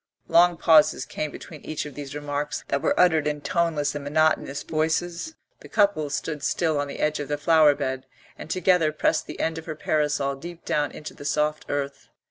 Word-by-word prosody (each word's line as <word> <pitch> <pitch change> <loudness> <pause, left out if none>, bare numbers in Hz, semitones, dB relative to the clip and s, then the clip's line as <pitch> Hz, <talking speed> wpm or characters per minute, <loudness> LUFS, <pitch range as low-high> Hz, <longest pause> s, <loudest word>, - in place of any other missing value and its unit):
Long 175 0 +5
pauses 155 -5 +4
came 155 +4 -4
between 150 +1 -10
each 155 - -4
of 150 - -8
these 145 0 -7
remarks; 145 0 -3
they - - +2
were - - 0
uttered 160 -4 +4
in 150 0 -1
toneless 150 -1 0
and 145 -1 -5
monotonous 145 -1 +1
voices. 170 - -1 0.2
The - - -14
couple 200 -8 +2
stood 145 +1 -3
still 160 0 0
on 145 - -1
the 140 - -7
edge 150 0 0
of 145 - -4
the 145 +1 -1
flower 150 -1 +5
bed, 130 0 -3 0.3
and - - -10
together 180 -3 +3
pressed 155 - 0
the - - -8
end 160 0 -1
of 160 - -13
her 155 - -4
parasol 150 -3 0
deep 170 +3 -10
down 145 -1 0
into 150 - -8
the - - -11
soft 150 +1 -1
earth. 140 -1 -3
150 Hz, 200 wpm, -25 LUFS, 145-160 Hz, 0.3 s, Long